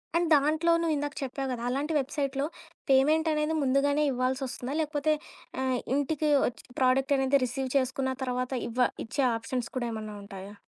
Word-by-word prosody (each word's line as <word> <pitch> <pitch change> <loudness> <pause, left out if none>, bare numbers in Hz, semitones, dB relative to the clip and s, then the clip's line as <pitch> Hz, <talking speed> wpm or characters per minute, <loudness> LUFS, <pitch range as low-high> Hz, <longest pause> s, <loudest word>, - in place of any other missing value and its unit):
And 340 0 +3
దాంట్లో 310 +4 +2
నువ్విందాక 295 -3 -1
చెప్పావు 270 +1 -3
గదా! 240 -2 -4
అలాంటి 285 +5 -1
వెబ్‌సైట్‌లో 275 0 -1 0.4
పేమెంట్ 300 +5 +4
అనేది 305 +1 0
ముందుగానే 280 +2 +2
ఇవ్వాల్సొస్తుందా? 255 0 -2
లేకపోతే 305 0 +1 0.5
ఆహ్, 260 -1 +1 0.2
ఇంటికి 300 +2 0 0.2
వచ్చి 245 - -4 0.2
ప్రోడక్ట్ 265 +2 +3
అనేది 270 +1 +3
రిసీవ్ 260 +2 -3
చేసుకున్న 265 0 0
తర్వాత 250 0 -2 0.2
ఇవ్వ 245 +1 +2 0.2
ఇచ్చే 270 +5 -1
ఆప్సన్స్ 230 +1 -3
కూడా 240 -2 -1
ఏమన్నా 215 -1 -6
ఉంటాయా? 200 0 -9
270 Hz, 145 wpm, -28 LUFS, 255-290 Hz, 0.5 s, పేమెంట్